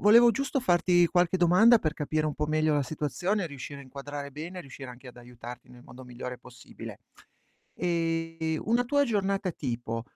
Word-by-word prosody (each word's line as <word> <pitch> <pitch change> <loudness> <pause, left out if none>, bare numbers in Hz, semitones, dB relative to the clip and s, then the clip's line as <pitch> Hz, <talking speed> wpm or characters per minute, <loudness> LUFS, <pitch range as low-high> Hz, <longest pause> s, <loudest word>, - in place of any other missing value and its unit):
volevo 235 +3 +7
giusto 275 +3 -1
farti 175 -4 +4
qualche 175 0 +2
domanda 185 +7 +6
per 155 -3 -1
capire 155 +1 -1
un 150 - -2
po' 150 - -1
meglio 155 0 +2
la 145 - +2
situazione, 175 +8 -1
riuscire 140 -1 -8
a - - -9
inquadrare 140 +2 -7
bene, 170 +6 -7
riuscire 135 -3 -10
anche 125 +1 -11
ad 125 - -13
aiutarti 120 0 -10
nel 125 -1 -15
modo 125 +2 -12
migliore 125 0 -7
possibile. 125 0 -11 0.8
Ehm, 165 -2 -1
una 235 +3 +3
tua 285 +3 +3
giornata 200 -4 0
tipo 120 -5 -4
155 Hz, 170 wpm, -28 LUFS, 130-185 Hz, 0.8 s, volevo